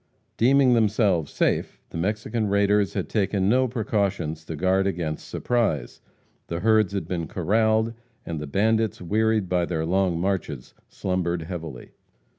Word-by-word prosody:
Deeming 130 +1 +4
themselves 105 - +2
safe, - - 0
the - - -6
Mexican 105 +4 -1
raiders 100 0 +2
had - - -2
taken 100 -2 0
no 130 +4 +3
precautions 100 - -1
to 80 - -6
guard 95 +4 +2
against 80 -5 -3
surprise. 110 - -1 0.5
The 85 0 -4
herds 110 -2 +3
had 95 -5 -3
been 85 -3 -3
corraled, 110 +4 +1 0.3
and 80 -2 -4
the 75 - -5
bandits, 110 +5 +1
wearied 110 +2 +1
by 90 -1 +1
their 80 -2 -2
long 90 -1 +1
marches, 85 -8 -3 0.2
slumbered 90 -2 -2
heavily. 80 -7 -7
95 Hz, 140 wpm, -25 LUFS, 85-110 Hz, 0.5 s, Deeming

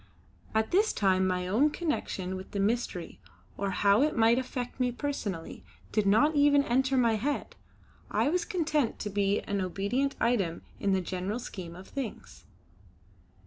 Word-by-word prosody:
At 220 0 +1
this 415 +4 +3
time 190 -2 +2
my 180 -1 -1
own 240 +11 +3
connection 295 - -3
with 185 +1 -8
the 200 - -2
mystery, 200 -4 -1 0.4
or 200 0 -2
how 200 +3 +3
it 300 -2 +1
might 230 +2 +5
affect 250 0 -5
me 250 -1 +2
personally, 230 - -4 0.3
did 210 -2 +1
not 225 +10 +4
even 285 -1 +5
enter 265 +1 +1
my 230 -3 +3
head. 280 +7 -2 0.5
I - - +1
was 350 +4 +1
content 305 - 0
to 210 - -4
be 200 0 +1
an 200 -1 -2
obedient 200 +10 -1
item 200 -9 0 0.2
in 195 - +1
the 190 - +2
general 185 +4 -3
scheme 180 -8 -7
of 185 +2 -11
things. 270 -6 -7
220 Hz, 160 wpm, -29 LUFS, 195-275 Hz, 0.5 s, might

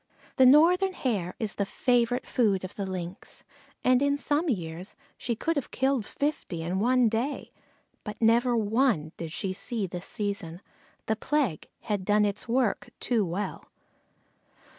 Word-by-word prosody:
The 260 -1 +7
Northern 355 +7 +5
Hare 205 - -2
is 215 -2 -2
the 200 - -1
favorite 245 +1 +1
food 205 -6 +1
of 185 - -6
the 200 -2 -4
Lynx, 185 +1 -7 0.4
and 255 0 +4
in 285 0 +2
some 300 +3 0
years 175 -4 -4 0.2
she 235 - -3
could 330 +8 -1
have 285 - -2
killed 265 -5 0
fifty 280 - -3
in 180 +3 -1
one 250 +2 +4
day, 235 +6 -2 0.5
but 210 - -7
never 235 +2 +3
one 220 - +1
did 165 -2 -6
she 185 +3 -2
see 220 +2 -3
this 180 0 -5
season. 200 -5 -3 0.4
The 220 - +1
plague 255 - -1
had 205 -3 -2
done 210 +2 +3
its 205 +2 -2
work 240 -2 0
too 235 -4 +1
well. 190 +3 -4
220 Hz, 155 wpm, -28 LUFS, 190-255 Hz, 0.5 s, The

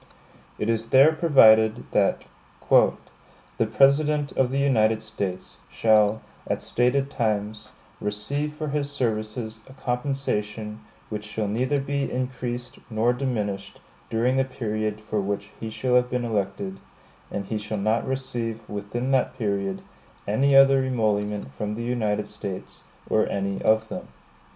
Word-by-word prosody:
It 105 - -2
is 115 0 0
there 135 +4 +7
provided 110 -9 +5
that - - +2 0.5
"The 115 - +1
President 145 +3 +3
of 130 -2 +1
the 135 - -2
United 110 -6 +2
States 95 -2 -5
shall, 110 -1 +3 0.3
at - - -2
stated 135 +3 +1
times, 105 -3 -2 0.3
receive 140 +9 -1
for 150 0 -5
his 145 0 -1
services 110 -3 -2
a - - -12
compensation 120 -5 -3 0.3
which 105 -1 -4
shall 105 0 -3
neither 130 +7 0
be 140 0 -2
increased 125 -1 -4
nor 115 +2 +2
diminished 110 -7 -3 0.3
during 125 +4 +1
the 135 - +4
period 110 -5 -3
for 105 -1 -2
which 100 +1 -3
he 110 - -4
shall 120 +3 -1
have 125 0 +4
been 125 -1 -1
elected; 100 -3 -2 0.5
and 100 - -4
he 110 +2 -3
shall 105 +1 -4
not 110 +3 0
receive 120 -4 -3
within 105 +6 -3
that 130 -1 +1
period 100 -4 -2 0.4
any 135 +7 +3
other 135 0 +7
emolument 105 - -1
from 105 +7 -3
the 115 - -4
United 105 -4 -1
States, 95 -2 -7 0.2
or - - +2
any 100 0 -2
of 110 0 +2
them." - - -6
110 Hz, 140 wpm, -25 LUFS, 105-130 Hz, 0.5 s, there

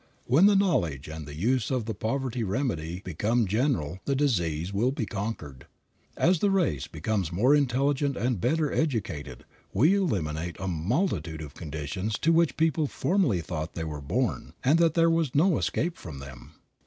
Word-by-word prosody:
When 155 +11 +5
the 205 - +5
knowledge 90 - +1
and 80 -1 -7
the 75 - -8
use 115 - +1
of 125 -4 -1
the 110 - -3
poverty 125 +1 -2
remedy 95 - -2
become 105 +7 +1
general 95 - 0
the 140 - +1
disease 90 - 0
will 110 +6 +2
be 130 -4 -2
conquered. 95 - -5 0.5
As 175 0 +3
the 205 - +2
race 160 - +1
becomes 90 +2 -2
more 115 +11 +3
intelligent 140 0 +1
and 120 -5 -1
better 155 - +1
educated 95 - -2 0.3
we 150 - +4
eliminate 85 - -1
a 95 - -3
multitude 85 - -1
of 70 -2 -9
conditions 80 +8 -4
to 165 - +2
which 165 -1 +2
people 160 -2 +2
formerly 170 - +1
thought 80 -1 -5
they 80 - -3
were 75 -2 -5
born, 70 - -2
and 150 +6 +4
that 165 -2 +3
there 165 0 +4
was 165 -5 0
no 170 +3 +4
escape 170 +2 -1
from 80 -5 -9
them. 65 -3 -11
110 Hz, 170 wpm, -27 LUFS, -, 0.5 s, When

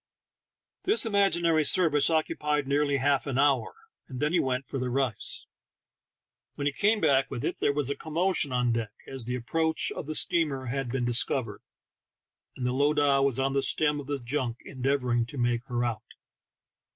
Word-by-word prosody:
This 405 - +4
imaginary 175 -7 +2
service 155 -3 +3
occupied 150 -2 0
nearly 140 0 +1
half 140 +1 +1
an 135 -2 -2
hour, 140 -1 +2 0.4
and 130 -2 -7
then 150 +4 0
he 180 - +4
went 130 0 -1
for 135 - -4
the 125 0 -2
rice; 130 -2 -2 1.1
when 145 - -4
he 145 - +1
came 210 +7 +2
back 140 -5 +2
with 120 - -4
it - - -3
there - - +2
was 140 -1 -1
a - - -2
commotion 160 0 0
on 125 -1 +1
deck, 115 -3 -3
as 135 -3 -5
the 125 +1 -2
approach 160 +7 -1
of - - -6
the 155 - -4
steamer 150 -7 +1
had 125 0 -3
been 130 -1 -1
discovered, 120 0 0 1.0
and 125 - -3
the 125 - 0
lowdahwas 140 -2 +2
on 135 0 0
the 140 - +1
stern 150 +1 +1
of 140 - -8
the 145 -1 -2
junk 120 -1 -3
endeavor 130 -1 -1
ing 120 -1 +1
to 140 - -10
make 120 -1 0
her 120 -2 -1
out. 120 -2 -2
140 Hz, 180 wpm, -28 LUFS, 125-150 Hz, 1.1 s, This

